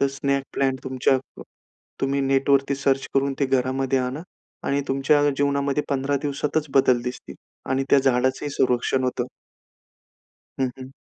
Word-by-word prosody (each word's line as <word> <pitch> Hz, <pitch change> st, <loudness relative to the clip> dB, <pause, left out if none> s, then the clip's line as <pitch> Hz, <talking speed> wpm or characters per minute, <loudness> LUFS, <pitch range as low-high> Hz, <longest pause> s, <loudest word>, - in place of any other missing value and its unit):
तर 140 Hz, -, +4 dB
snake 140 Hz, 0 st, 0 dB
plant 135 Hz, -1 st, 0 dB
तुमच्या 130 Hz, 0 st, +1 dB, 0.3 s
अ, -, -, -7 dB, 0.6 s
तुम्ही 140 Hz, +1 st, +1 dB
नेटवरती 135 Hz, 0 st, +2 dB
सर्च 135 Hz, -1 st, +1 dB
करून 135 Hz, 0 st, +2 dB
ते 140 Hz, -, +3 dB
घरामध्ये 130 Hz, 0 st, +1 dB
आणा 130 Hz, +3 st, -3 dB, 0.5 s
आणि 140 Hz, +1 st, +1 dB
तुमच्या 135 Hz, +2 st, +3 dB
जीवनामध्ये 140 Hz, +1 st, 0 dB
15 140 Hz, +1 st, 0 dB
दिवसातच 150 Hz, +1 st, -1 dB
बदल 130 Hz, -2 st, +4 dB
दिसतील 125 Hz, 0 st, -6 dB, 0.4 s
आणि 135 Hz, +1 st, +1 dB
त्या 140 Hz, -, +7 dB
झाडाचंही 130 Hz, +2 st, +1 dB
संरक्षण 130 Hz, -1 st, +1 dB
होतं. 125 Hz, -1 st, -1 dB, 1.4 s
हं, 130 Hz, -, +1 dB
हं. 130 Hz, 0 st, -9 dB
135 Hz, 140 wpm, -23 LUFS, 130-140 Hz, 1.4 s, त्या